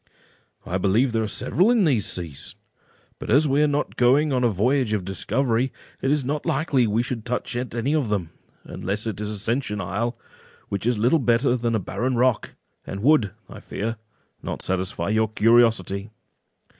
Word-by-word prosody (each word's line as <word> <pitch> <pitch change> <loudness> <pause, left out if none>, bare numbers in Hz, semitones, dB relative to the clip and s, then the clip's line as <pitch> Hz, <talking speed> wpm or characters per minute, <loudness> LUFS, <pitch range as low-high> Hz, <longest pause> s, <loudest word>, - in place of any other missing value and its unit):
"I 90 +2 -2
believe 110 +7 +2
there 115 0 0
are 110 - -1
several 180 - +1
in 235 -5 +4
these 125 -10 +1
seas; 85 -6 -5 0.6
but - - -7
as 145 +7 +4
we 140 +1 +2
are 150 - +4
not 145 0 -2
going 135 +4 +4
on 125 -1 +1
a 120 - +4
voyage 115 +3 +1
of 100 -4 -1
discovery, 120 +5 0 0.3
it 135 - 0
is 145 -2 +1
not 145 +2 -2
likely 140 -6 +1
we 110 +3 +1
should 120 -2 -4
touch 125 0 -3
at 120 -1 -4
any 125 +5 0
of 145 -8 0
them, 95 -6 -2 0.3
unless 105 +4 -4
it 110 -2 -4
is 105 - -3
Ascension 110 +1 -2
Isle, 110 +6 -2 0.5
which 100 +3 -2
is 120 -2 +2
little 125 +9 +3
better 120 0 +2
than 120 -2 -1
a - - +1
barren 125 +7 -2
rock, 125 -1 +1 0.3
and 100 +2 -6
would, 135 -7 +4 0.2
I - - -10
fear, 115 +2 -4 0.4
not - - -5
satisfy 95 +1 -2
your 110 +1 +2
curiosity." 110 -3 +3
115 Hz, 180 wpm, -23 LUFS, 105-135 Hz, 0.6 s, in